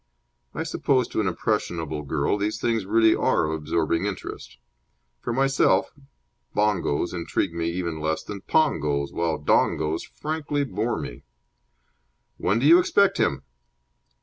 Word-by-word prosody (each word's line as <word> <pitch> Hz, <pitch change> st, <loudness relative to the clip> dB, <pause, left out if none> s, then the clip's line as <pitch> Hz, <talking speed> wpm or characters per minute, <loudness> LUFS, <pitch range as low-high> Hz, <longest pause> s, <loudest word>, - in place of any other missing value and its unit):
I -, -, -2 dB
suppose 130 Hz, -3 st, +1 dB
to -, -, -1 dB
an 100 Hz, -, -1 dB
impressionable 85 Hz, -6 st, -2 dB
girl 70 Hz, +4 st, 0 dB
these 105 Hz, +1 st, -2 dB
things 115 Hz, -4 st, 0 dB
really 110 Hz, +1 st, +4 dB
are -, -, +2 dB
of 80 Hz, -, -2 dB
absorbing 80 Hz, +3 st, 0 dB
interest. 95 Hz, -3 st, -7 dB, 0.6 s
For 120 Hz, -, -4 dB
myself, 135 Hz, -6 st, +2 dB, 0.6 s
bongos 95 Hz, -6 st, +1 dB
intrigue 85 Hz, +1 st, -2 dB
me 85 Hz, 0 st, -1 dB
even 85 Hz, -2 st, -3 dB
less 80 Hz, +1 st, -1 dB
than 100 Hz, -2 st, -7 dB
pongos, 75 Hz, -, +1 dB
while 85 Hz, -2 st, 0 dB
dongos 80 Hz, +2 st, +1 dB
frankly 150 Hz, -2 st, -3 dB
bore 115 Hz, -1 st, -2 dB
me. -, -, -7 dB, 1.2 s
"When 100 Hz, +5 st, +1 dB
do 125 Hz, -, 0 dB
you 170 Hz, +4 st, +8 dB
expect 195 Hz, +2 st, +3 dB
him?" 70 Hz, -1 st, +1 dB
95 Hz, 135 wpm, -25 LUFS, 80-115 Hz, 1.2 s, you